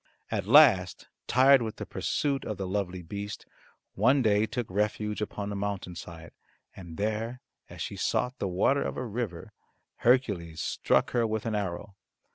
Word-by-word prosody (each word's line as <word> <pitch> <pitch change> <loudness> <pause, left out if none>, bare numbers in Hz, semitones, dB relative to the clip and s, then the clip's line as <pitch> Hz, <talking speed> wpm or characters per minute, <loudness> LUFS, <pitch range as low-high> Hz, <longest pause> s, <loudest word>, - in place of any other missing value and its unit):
At 100 -4 -2
last 115 - +5 0.2
tired 130 +1 +6
with 110 -2 -4
the - - -6
pursuit 140 -2 -1
the 100 -2 -4
lovely 95 -2 -3
beast 100 +4 -6 0.5
one 125 +6 +3
day 105 0 +3
took 120 +2 -3
refuge 105 +2 -1
upon 105 -1 -4
a - - -4
mountain 100 -3 -3
side, 85 -1 -10 0.4
and 85 -4 -10
there 110 +4 -2 0.3
as - - -6
she - - -6
sought 125 +1 -1
the 100 - -1
water 100 +10 +2
of - - -3
a 130 - -3
river, 110 -6 -5 0.4
Hercules 100 -11 +1
struck - - +1
her 120 -2 +1
with 110 -1 -3
an 115 - -1
arrow. 100 0 -3
105 Hz, 160 wpm, -28 LUFS, 95-120 Hz, 0.5 s, tired